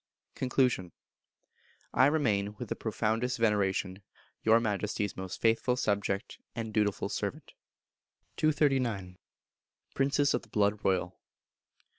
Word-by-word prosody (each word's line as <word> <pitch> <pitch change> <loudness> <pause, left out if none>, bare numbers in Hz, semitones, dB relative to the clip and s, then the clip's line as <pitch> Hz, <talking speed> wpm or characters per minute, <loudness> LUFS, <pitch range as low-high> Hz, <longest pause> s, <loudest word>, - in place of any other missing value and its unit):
Conclusion. 125 - 0 1.0
I 130 +2 +6
remain, 105 -9 +1
with 120 -1 -7
the - - -1
profoundest 115 +3 -1
veneration, 100 -3 +1 0.4
Your 110 +1 +5
Majesty's 105 -2 -1
most 95 -1 -6
faithful 115 +2 +2
subject 100 -4 -1 0.2
and 110 -2 -4
dutiful 105 -2 +1
servant. - - -4 0.8
239. 130 -12 +1 0.7
Princes 140 +1 +2
of - - 0
the 115 - -19
Blood 105 0 +1
Royal. 95 -1 0
110 Hz, 105 wpm, -30 LUFS, 100-125 Hz, 1.0 s, I